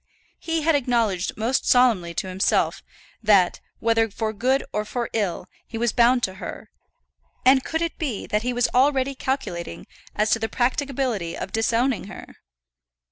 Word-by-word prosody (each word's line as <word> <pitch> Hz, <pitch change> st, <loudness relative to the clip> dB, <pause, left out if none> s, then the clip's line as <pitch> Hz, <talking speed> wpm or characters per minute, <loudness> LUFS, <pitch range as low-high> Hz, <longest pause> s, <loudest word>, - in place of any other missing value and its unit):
He 325 Hz, -2 st, -2 dB
had 325 Hz, +1 st, +3 dB
acknowledged 235 Hz, -9 st, 0 dB
most 230 Hz, +5 st, 0 dB
solemnly 220 Hz, -10 st, +3 dB
to 190 Hz, -, -2 dB
himself 185 Hz, +1 st, +1 dB, 0.4 s
that, 200 Hz, -5 st, +4 dB, 0.2 s
whether 225 Hz, 0 st, +2 dB
for 215 Hz, +1 st, -3 dB
good 260 Hz, +6 st, +1 dB
or 210 Hz, -, 0 dB
for 235 Hz, +2 st, -4 dB
ill, 200 Hz, -6 st, -1 dB, 0.2 s
he 230 Hz, -, -6 dB
was 235 Hz, 0 st, +1 dB
bound 245 Hz, +1 st, +4 dB
to 190 Hz, -, 0 dB
her; -, -, -8 dB, 0.7 s
and 260 Hz, 0 st, +6 dB
could 320 Hz, +1 st, -2 dB
it 335 Hz, -, -4 dB
be 270 Hz, -, -3 dB
that 210 Hz, -1 st, 0 dB
he 250 Hz, +2 st, -1 dB
was 245 Hz, 0 st, +1 dB
already 270 Hz, +1 st, +3 dB
calculating 255 Hz, -11 st, -4 dB, 0.3 s
as 210 Hz, +1 st, +1 dB
to 230 Hz, -, +3 dB
the 225 Hz, 0 st, -2 dB
practicability 250 Hz, -, -1 dB
of 190 Hz, -, -5 dB
disowning 230 Hz, +2 st, +1 dB
her? 195 Hz, -, -11 dB
235 Hz, 160 wpm, -23 LUFS, 210-260 Hz, 0.7 s, and